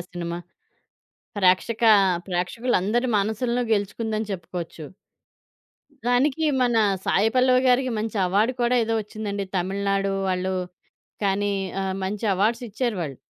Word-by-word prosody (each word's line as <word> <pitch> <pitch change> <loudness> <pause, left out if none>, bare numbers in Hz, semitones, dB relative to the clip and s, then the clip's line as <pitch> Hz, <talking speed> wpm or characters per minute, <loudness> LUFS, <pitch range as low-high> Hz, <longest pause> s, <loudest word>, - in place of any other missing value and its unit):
Cinema. 170 -1 -4 1.0
ప్రేక్షక 200 +5 +2 0.5
ప్రేక్షకులందరి 215 +5 0
మనసులను 235 +4 0
గెలుచుకుందని 215 +1 -2
చెప్పుకోవచ్చు. 175 -3 -6 1.2
దానికి 265 +5 +2 0.2
మన 245 -2 +2 0.3
'సాయి 205 +3 +2
పల్లవి' 255 0 +4
గారికి 255 +1 +3
మంచి 220 +1 -3
అవార్డ్ 205 +7 +2
కూడా 240 +1 +2
ఏదో 225 0 -1
వచ్చిందండి. 205 -1 -4
తమిళనాడు 195 +2 0 0.2
వాళ్ళు 185 0 -1 0.7
కానీ 200 +1 +1 0.3
ఆహ్, 190 0 -2
మంచి 205 +3 -3
అవార్డ్స్ 220 +6 +1
ఇచ్చారువాళ్ళు. 200 - -3
205 Hz, 105 wpm, -24 LUFS, 190-240 Hz, 1.2 s, పల్లవి